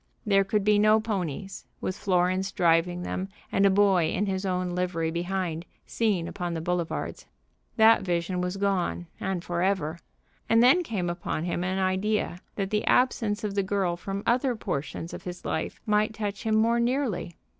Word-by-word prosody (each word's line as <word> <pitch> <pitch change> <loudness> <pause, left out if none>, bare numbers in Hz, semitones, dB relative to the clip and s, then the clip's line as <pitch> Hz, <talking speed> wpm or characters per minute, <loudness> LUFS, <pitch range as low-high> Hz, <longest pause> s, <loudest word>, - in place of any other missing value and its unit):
There 195 -2 +4
could 200 +1 0
be 210 0 +4
no 215 +1 +5
ponies, 195 -4 -4
with 185 - -3
Florence 185 0 +1
driving 175 0 +2
them, 190 +2 -3 0.2
and 200 0 +4
a - - +5
boy 190 -4 +4
in 205 - 0
his 190 0 -2
own 180 -1 -1
livery 175 -2 -1
behind, 175 -1 -2 0.2
seen 200 -7 0
upon 175 -2 -4
the - - -2
boulevards. 170 0 -3 0.5
That 220 0 +6
vision 180 0 -1
was 180 +2 -2
gone, 195 -3 0
and 190 -3 -2
forever. 175 -2 -1 0.5
And 225 +1 +5
then 270 +9 +6
came 205 - -2
upon 175 -2 -3
him 175 0 -2
an 185 +1 -1
idea 190 0 0 0.2
that 195 -2 -2
the 210 0 +1
absence 225 -5 +2
of 210 -2 -2
the 200 - +1
girl 190 -2 0
from 195 +3 -5
other 250 +1 +2
portions 165 -4 -4
of - - -6
his 180 0 -8
life 160 - -3
might 215 0 +1
touch 205 -2 -3
him 220 -1 +1
more 230 +2 +3
nearly. 235 - -1
190 Hz, 175 wpm, -27 LUFS, 175-210 Hz, 0.5 s, That